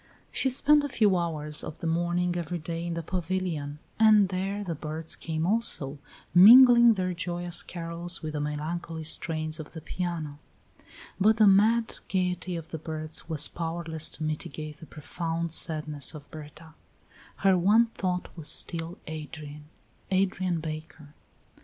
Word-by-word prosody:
She 265 - +1
spent 295 +3 +4
a 285 - -3
few 210 -6 +3
hours 155 -3 -1
of 155 - -7
the - - -8
morning, 175 +2 0
every 175 0 -3
day, 165 +1 -5
in 170 - -3
the 170 - -4
pavilion, 175 -4 -3 0.2
and 215 -3 +6
there 195 +2 -3
the 175 -4 -3
birds 155 +1 -5
came 160 0 -3
also, 170 -9 +1 0.3
mingling 235 +4 +8
their 185 -2 -2
joyous 175 0 0
carols 170 +1 -3
with 155 -1 -4
the 150 - -2
melancholy 160 +2 -4
strains 155 0 -1
of 155 - -9
the 160 - -8
piano; 160 -4 -5 0.8
but 215 +3 +4
the 215 - +6
mad 220 +4 +3
gayety 180 -1 -1
of 165 -1 -7
the 160 - -5
birds 155 +1 -5
was 155 -2 +2
powerless 165 -1 -3
to 155 - -5
mitigate 155 0 -5
the 160 - -12
profound 165 +2 -4
sadness 155 -2 +2
of 145 -1 -12
Berta; 155 +1 -11 0.6
her 195 -1 +3
one 205 +6 +4
thought 180 -2 -3
was 160 -3 -4
still 170 +1 -2
Adrian 150 -1 -8 0.4
Adrian 185 -2 0
Baker. 155 -1 -8
170 Hz, 150 wpm, -27 LUFS, 155-185 Hz, 0.8 s, mingling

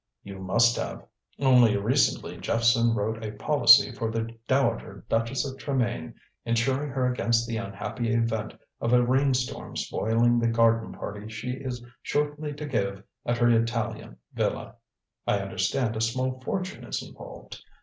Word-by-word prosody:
"You 100 -1 -9
must 115 +6 +3
have. - - -5 0.3
Only 125 -6 +5
recently 120 +8 +1
Jephson 115 0 +2
wrote 110 +1 -2
a 105 -1 -4
policy 140 +4 +6
for 115 -2 -3
the 115 +1 -3
Dowager 115 -7 0
Duchess 115 +5 0
of 135 -1 -6
Tremayne, 120 - -2 0.3
insuring 130 +5 0
her 130 -1 -1
against 120 -2 +1
the 115 -1 -2
unhappy 110 +2 -3
event 115 -2 -1 0.2
of 115 +1 0
a 125 0 +5
rainstorm 130 0 0
spoiling 120 +2 +1
the 115 - +1
garden 115 0 +3
party 105 +1 -7
she 115 +3 -5
is 125 -2 -5 0.2
shortly 150 +1 -1
to 145 +1 -6
give 100 -7 -2 0.2
at 120 - +1
her 120 0 +4
Italian 115 -1 -1 0.2
villa. - - -2 0.5
I - - +3
understand 100 +5 -1
a 110 - -2
small 130 +3 -1
fortune 185 +6 -4
is - - -4
involved. - - -11
115 Hz, 150 wpm, -27 LUFS, 110-130 Hz, 0.5 s, policy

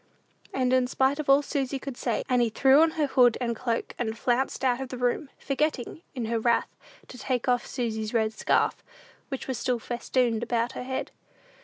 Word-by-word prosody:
And, 255 -1 +1
in 255 -1 +3
spite 265 +3 +1
of 300 - -3
all 275 +1 +6
Susy 275 -1 -2
could 270 -1 -7
say, - - -1
Annie 245 -2 +2
threw 270 +6 +5
on 325 0 +4
her 305 - +3
hood 250 -4 +4
and 235 -2 -1
cloak, 230 0 -2
and 225 -2 -2
flounced 260 +2 0
out 250 0 +2
of 265 - -5
the 255 - -6
room; 250 +3 0
forgetting, 295 0 -2
in 245 -3 -2
her 230 +1 0
wrath, 235 +1 +1 0.3
to 250 - -11
take 255 -1 -2
off 245 -1 +1
Susy's 220 -4 -3
red 220 -2 +1
scarf, - - +1 0.5
which 270 -2 -5
was 260 -3 -3
still 250 0 0
festooned 240 0 -1
about 235 +1 0
her - - -6
head. 260 +1 -4
250 Hz, 195 wpm, -27 LUFS, 235-265 Hz, 0.5 s, all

